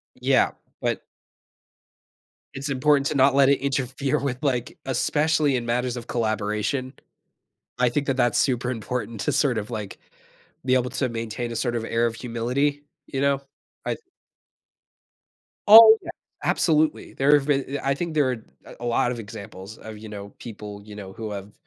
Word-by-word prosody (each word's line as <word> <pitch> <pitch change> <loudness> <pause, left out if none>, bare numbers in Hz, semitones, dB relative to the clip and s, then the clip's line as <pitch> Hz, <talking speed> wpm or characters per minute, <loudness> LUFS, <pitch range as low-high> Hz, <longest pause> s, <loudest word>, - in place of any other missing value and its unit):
Yeah, - - +3 0.3
but - - -1 1.5
It's 135 +2 -5
important 140 +1 +3
to 145 - -2
not 135 0 +4
let 140 -1 +6
it 140 - +3
interfere 135 0 -1
with, 135 -3 -2
like, 125 -5 -1
especially 150 +1 +1
in 120 -1 -2
matters 125 +1 -1
of 120 0 -7
collaboration, 110 +3 -1 0.9
I 125 - +4
think 140 +4 -1
that 135 - 0
that's 120 -3 +2
super 125 -2 +1
important 115 -2 -4
to - - 0
sort 125 -6 +2
of, 105 +2 -5
like, 105 -4 -5 0.7
be 130 - +2
able 125 -1 +2
to 130 -3 -1
maintain 115 +1 -4
a 115 - -5
sort 120 +1 -1
of 115 -1 -2
air 115 +1 +1
of 115 -1 -1
humility, 125 +5 -1 0.2
you 135 -1 -3
know, 140 -1 +2 0.4
I - - -1 1.7
Oh, 220 +1 +11
yeah, - - -9 0.3
absolutely. 155 -2 +1
There 140 +2 +3
have 135 - -3
been, 140 -1 0
I 135 - 0
I - - +4
think 170 +2 -3
there 145 -4 +2
a 115 -3 -10
a 120 - -6
lot 120 +1 +1
of 120 - -4
examples 100 -1 -9
of, 110 -1 -9
you 110 +1 -10
know, 100 -1 -7
people, 105 -3 -8
you 105 0 -11
know, 100 -2 -8
who 110 0 -6
have, 100 0 -7
125 Hz, 170 wpm, -24 LUFS, 115-140 Hz, 1.7 s, Oh